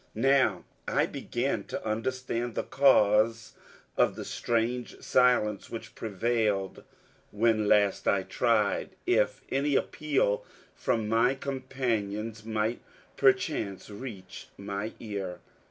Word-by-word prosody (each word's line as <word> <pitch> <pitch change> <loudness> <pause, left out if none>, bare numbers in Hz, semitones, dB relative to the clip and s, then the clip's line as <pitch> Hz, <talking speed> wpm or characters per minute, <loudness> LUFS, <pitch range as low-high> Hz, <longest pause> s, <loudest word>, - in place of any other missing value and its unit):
Now 130 -5 +3 0.2
I - - +2
began - - -2
to - - -6
understand 120 +1 -2
the - - -1
cause 115 -4 +3 0.4
of - - +3
the - - -6
strange 120 +1 -1
silence 125 -5 +2
which 115 - -7
prevailed 110 -2 -1 0.5
when 110 0 +2
last 105 -1 +3
I 100 -1 +3
tried 105 0 +1
if - - +1
any 140 +1 +1
appeal 135 -11 +1 0.3
from 110 -2 -1
my 115 +4 +3
companions 115 -6 -3
might 110 +1 -1 0.3
perchance 135 - +1
reach 100 -4 -8
my 100 +2 -4
ear. 100 -5 -5
115 Hz, 105 wpm, -29 LUFS, 105-125 Hz, 0.5 s, Now